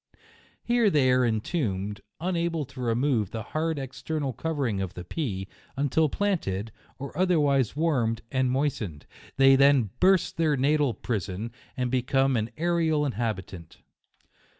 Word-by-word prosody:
Here 235 -2 +3
they 140 -7 +3
are 125 0 +4
en 110 -3 +1
tombed, 105 - -2 0.2
unable 170 -3 -1
to 135 0 -10
remove 120 -3 +1
the 110 -1 -5
hard 160 +6 -2
external 140 +1 -3
covering 135 -8 -2
of 95 -1 -4
the 90 - -6
pea, 95 - -3 0.3
until 145 +3 +2
planted, 115 - -1 0.3
or 140 +1 -7
other 180 -1 +3
wise 140 -5 +2
warmed 130 -8 0
and 130 -1 +1
moistened; 125 - -2 0.3
they 135 0 +7
then 135 -6 +4
burst 190 0 +3
their 155 -3 +2
natal 140 -2 +2
prison, 105 0 -3 0.3
and 125 -1 -1
become 135 +1 +2
an 110 0 -1
aerial 160 -3 +1
in 140 - 0
habitant. 95 -7 -5
135 Hz, 145 wpm, -27 LUFS, 115-155 Hz, 0.3 s, they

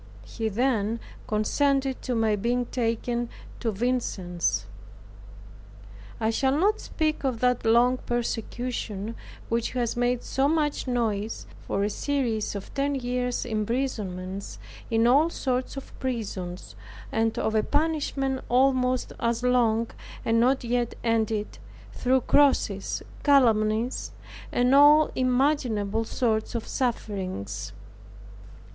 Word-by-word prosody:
He 225 -2 -3
then 225 -1 0 0.3
consented 270 +5 +1
to 250 - -2
my 220 -2 +2
being 240 +4 0
taken 235 0 -1 0.3
to 230 - -1
Vincennes. 200 -6 -1 1.5
I 220 0 +1
shall 265 +4 +1
not 415 +6 +2
speak 310 -2 -2
of 255 -4 -1
that 250 -1 +2
long 240 +3 +5
persecution, 235 -3 -3 0.3
which 230 0 -1
has 240 -2 -1
made 245 0 0
so 270 +1 +1
much 300 -3 0
noise, 225 -4 -1 0.2
for 200 - 0
a 205 - +1
series 240 -6 -1
of 200 - -7
ten 280 0 0
years 250 -1 -1
imprisonments, 210 -5 -3 0.3
in 225 0 +3
all 285 +7 +5
sorts 255 -4 -2
of 275 - -8
prisons, 200 -8 -4 0.4
and 225 0 0
of 220 - 0
a 215 - +3
banishment 285 -2 0
almost 255 0 +2
as 235 0 0
long, 235 -2 +3 0.4
and 230 0 +3
not 255 +3 +3
yet 240 0 -1
ended, 220 -2 0 0.3
through 260 +1 +2
crosses, 235 -9 +2 0.2
calumnies, 230 -4 +2 0.4
and 245 +2 +3
all 295 +2 +7
imaginable 250 -5 +1
sorts 220 -1 -1
of 230 - -3
sufferings. 190 - -3
240 Hz, 115 wpm, -26 LUFS, 220-260 Hz, 1.5 s, all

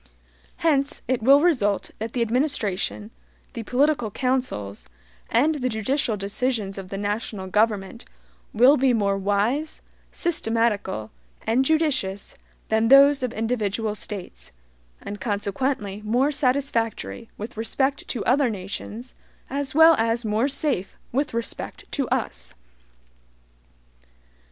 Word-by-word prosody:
Hence, 285 -1 +1
it 255 -2 0
will 275 +5 +6
result 245 - +1
that 225 +1 -4
the 240 - +1
administration, 215 - -1 0.4
the 230 - -5
political 255 0 +1
counsels, 200 - -2 0.4
and 290 +7 +3
the 255 -4 -1
judicial 220 +1 -1
decisions 205 -1 -2
of 190 - -8
the 195 - -4
national 205 -1 -3
government 205 0 0 0.5
will 255 +6 +6
be 260 -1 +3
more 200 -3 +1
wise, 205 +10 -1 0.3
systematical, 225 - 0 0.3
and 240 +4 +3
judicious 270 -11 0 0.3
than 220 +1 +2
those 275 +2 +7
of 255 -2 -1
individual 220 -2 -1
States, 175 - -7 0.5
and 205 -1 -7
consequently 205 +1 -2
more 245 +7 +2
satisfactory 255 -5 -1
with 220 +5 -7
respect 265 +5 -1
to 235 - -3
other 260 +1 +3
nations, 210 +4 -6 0.4
as 280 0 -3
well 320 +1 +8
as 230 +1 0
more 215 +4 +1
SAFE 275 - -2
with 280 +4 0
respect 235 0 -5
to - - -1
us. - - -3
230 Hz, 115 wpm, -24 LUFS, 205-270 Hz, 0.5 s, well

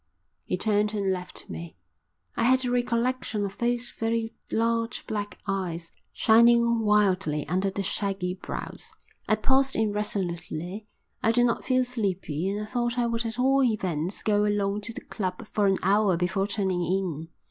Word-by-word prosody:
He 180 - -1
turned 210 +1 +1
and 200 -2 +1
left 180 -1 -7
me. 85 +1 -8 0.6
I 230 - +1
had 260 +1 +4
a 245 - 0
recollection 240 -3 0
of 200 0 -7
those 240 0 0
very 225 0 -1 0.2
large 230 +1 0
black 205 -1 -4
eyes, 175 -4 -3 0.2
shining 235 +1 +5
wildly 195 -8 +2
under 185 +4 +1
the 195 +1 -3
shaggy 195 -2 -2
brows. 185 - -6 0.4
I 215 - +5
paused 265 +4 +2
irresolutely. 200 -2 -2 0.3
I 225 - +3
did 240 +1 +4
not 235 - 0
feel 255 -1 +3
sleepy 190 - -2
and 205 +1 -2
I 210 - -3
thought 240 +2 -1
I 240 - +2
would 230 0 -1
at 225 0 -5
all 270 +2 +4
events 185 - -1
go 210 -1 +3
along 205 0 0
to 220 +2 -2
the - - -7
club 185 -1 -4
for 205 -2 +3
an 195 -1 +3
hour 195 -1 +3
before 185 +3 0
turning 190 -3 0
in. 170 -3 -1
210 Hz, 165 wpm, -27 LUFS, 190-230 Hz, 0.6 s, shining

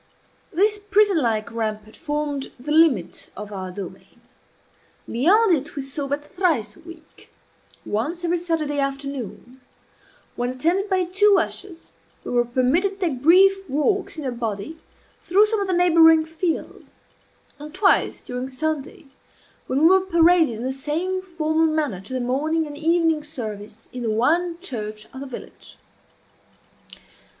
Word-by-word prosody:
This 415 +4 +2
prison 410 -3 +3
like 225 -3 -1
rampart 215 -1 -4
formed 295 -3 -3
the 290 +4 -6
limit 305 - +2
of 210 +1 -7
our 190 -1 -5
domain; 185 0 -10 0.9
beyond 365 - +3
it 290 0 -5
we 280 - -3
saw 275 +1 -4
but 285 +1 -3
thrice 315 - -1
a - - -18
week 330 -1 -15 0.5
once 310 +12 -2
every 345 +1 +1
Saturday 320 -4 -2
afternoon, 275 -3 -5 0.7
when, 245 0 -2
attended 340 +10 0
by 375 -1 +2
two 390 +3 +4
ushers, 365 -4 -6 0.3
we - - -6
were 240 -1 +2
permitted 285 +12 +1
to 360 -3 +1
take 260 -4 -6
brief 385 +4 +5
walks 345 +7 0
in 305 - -5
a 260 - -1
body 235 +5 -5 0.5
through 395 +5 +5
some 430 -1 0
of 395 - -2
the - - -1
neighboring 325 -2 +5
fields 325 +1 -4 0.7
and 300 +1 -9
twice 385 +1 +2
during 250 +1 -5
Sunday, 300 +2 -4 0.6
when 265 +2 0
we - - +7
were 380 +3 +6
paraded 340 -6 +3
in 225 - -6
the 260 - -1
same 320 +8 -2
formal 325 -3 0
manner 300 - -1
to 200 - -13
the 260 - -1
morning 300 +6 0
and 295 -1 -8
evening 325 0 +2
service 220 -7 -7
in 250 - -6
the 230 - -1
one 330 +10 +1
church 215 - -5
of 265 - -8
the 280 - -7
village. 260 - -10
305 Hz, 150 wpm, -23 LUFS, 250-350 Hz, 0.9 s, we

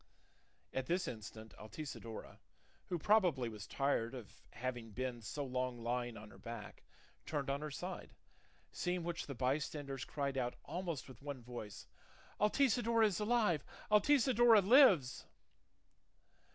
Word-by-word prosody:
At 130 -1 -2
this 180 +2 +1
instant 110 -1 -8
Altisidora, 115 0 -7 0.5
who 175 - -1
probably 170 - +3
was 105 -3 -8
tired 135 -3 0
of 105 -7 -10
having 120 -1 -4
been 125 +2 -4
so 140 +6 -4
long 125 -1 -2
lying 120 0 -2
on 105 0 -11
her - - -15
back, 115 -2 -8 0.5
turned 145 -3 -1
on 140 +1 -2
her 155 - -3
side; 180 +6 -6 0.6
seeing 180 -1 -1
which 170 0 -3
the 140 - -5
bystanders 135 +1 -1
cried 140 -2 -2
out 120 -1 -1
almost 170 -6 -4
with 130 -4 -13
one 140 -3 -6
voice, 110 -5 -8 0.5
"Altisidora 230 0 +3
is 200 -5 +1
alive! 210 -8 +2 0.3
Altisidora 240 -1 +6
lives!" 200 - +6
140 Hz, 130 wpm, -37 LUFS, 120-180 Hz, 0.6 s, Altisidora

